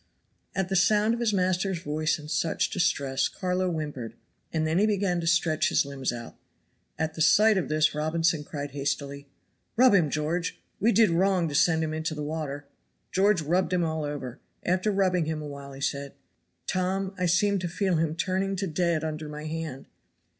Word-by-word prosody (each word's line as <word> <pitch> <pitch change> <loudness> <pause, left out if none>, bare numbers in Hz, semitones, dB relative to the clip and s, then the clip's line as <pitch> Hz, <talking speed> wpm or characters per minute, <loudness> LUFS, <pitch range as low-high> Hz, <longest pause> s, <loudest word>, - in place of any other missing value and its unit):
At 190 -2 0
the 195 - 0
sound 210 +4 +4
of 235 - -3
his 235 -2 +1
master's 185 -1 +1
voice 155 0 -1
in 150 -1 -10
such 160 +1 0
distress, 140 -7 +1
Carlo 185 -1 -1
whimpered, 145 -9 -4 0.4
and 160 -1 0
then 160 +3 +1
he 210 - +4
began 195 -4 +1
to 165 - -3
stretch 165 -2 +2
his - - +2
limbs 135 -3 -3
out. 120 -1 -8 0.6
At 160 0 -1
the 160 - -5
sight 215 +7 +6
of 190 - -1
this 155 0 +2
Robinson 160 +1 0
cried 145 -1 -6
hastily: 140 0 -3 0.5
"Rub 250 0 +6
him, 175 -7 +4
George; 160 +4 -2 0.2
we 225 +4 +3
did 220 -3 +5
wrong 180 0 +2
to - - -6
send 160 +2 +3
him 155 0 -2
into 160 0 -2
the 150 - -4
water." 145 -2 -4 0.5
George 190 -2 +3
rubbed 180 +5 +1
him 180 -1 +2
all 160 -1 -1
over. 145 -3 -5 0.2
After 185 +4 +1
rubbing 185 -4 +2
him 160 0 -2
a 150 - -6
while, 140 -1 -8
he 135 - -10
said: 140 0 -2 0.5
"Tom, 190 +1 -1
I 180 - +1
seem 200 +4 +2
to 175 - -2
feel 185 0 0
him 160 -1 0
turning 190 +2 -1
to 195 +1 -2
dead 170 -2 0
under 155 -1 -4
my 150 +1 -7
hand." 155 -4 -5
165 Hz, 190 wpm, -27 LUFS, 150-185 Hz, 0.6 s, sight